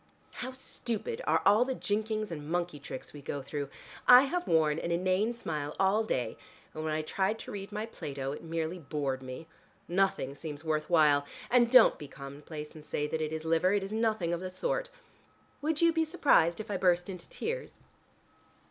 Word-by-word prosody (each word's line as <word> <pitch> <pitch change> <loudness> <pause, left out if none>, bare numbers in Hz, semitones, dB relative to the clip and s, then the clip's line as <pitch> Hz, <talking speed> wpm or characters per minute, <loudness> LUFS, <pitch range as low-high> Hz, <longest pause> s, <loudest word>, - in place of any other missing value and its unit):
How 255 +1 -5
stupid 260 - -4
are - - +3
all 215 +4 +6
the 260 0 -2
jinkings 215 -1 -1
and 150 -2 -6
monkey 175 -3 -1
tricks 130 -2 -8
we 145 - -9
go 140 0 -4
through! 140 0 -4 0.4
I 250 +1 +10
have 350 +6 -2
worn 160 -1 +3
an 170 - -3
inane 185 +6 +1
smile 150 -9 -4
all 195 +3 +3
day, 125 - -2 0.4
and 155 - -5
when 155 - -1
I 155 0 -1
tried 195 +6 0
to - - -8
read 200 0 -6
my 210 +1 -3
Plato, 140 -10 -5
it 145 - -7
merely 165 +2 -3
bored 140 -4 -2
me. 130 +5 -7 0.4
Nothing 180 -7 +1
seems 150 +1 -7
worth 155 -1 -1
while. 150 -4 +4 0.2
And 240 -1 +5
don't 255 -1 +7
be 145 - -7
commonplace, 145 +3 -8
and 155 - -11
say 150 0 -2
that 155 +1 -2
it 155 0 -1
is 160 0 -4
liver. 165 +4 +3
It 205 -1 +1
is 195 +2 -5
nothing 220 -6 +1
of 170 - -1
the 185 +1 -5
sort. - - -2 0.7
Would 310 +2 0
you 335 0 +5
be 325 0 +2
surprised 285 - +3
if 215 0 -5
I 195 - 0
burst 180 -1 +3
into 180 -3 -8
tears?" 480 +2 -4
175 Hz, 195 wpm, -31 LUFS, 150-220 Hz, 0.7 s, I